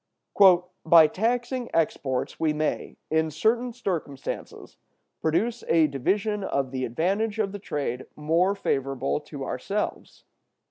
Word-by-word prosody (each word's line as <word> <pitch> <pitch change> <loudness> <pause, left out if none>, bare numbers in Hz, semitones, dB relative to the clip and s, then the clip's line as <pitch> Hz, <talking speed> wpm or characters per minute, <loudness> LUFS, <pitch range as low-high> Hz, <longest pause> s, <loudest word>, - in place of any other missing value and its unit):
"By 160 0 +8
taxing 240 - -1
exports 140 -5 -1
we 155 -2 +2
may, 155 0 -2
in 160 0 +2
certain 225 - +1
circumstances, 160 - -5 0.4
produce 225 +10 0
a 165 -1 +5
division 195 - 0
of 135 -7 -1
the 130 -1 -2
advantage 195 - -1
of 210 -3 0
the 205 - -6
trade 140 - -4
more 165 +6 +2
favorable 135 -7 -1
to 145 -2 -8
ourselves. 200 +13 -4
160 Hz, 120 wpm, -26 LUFS, 140-210 Hz, 0.4 s, By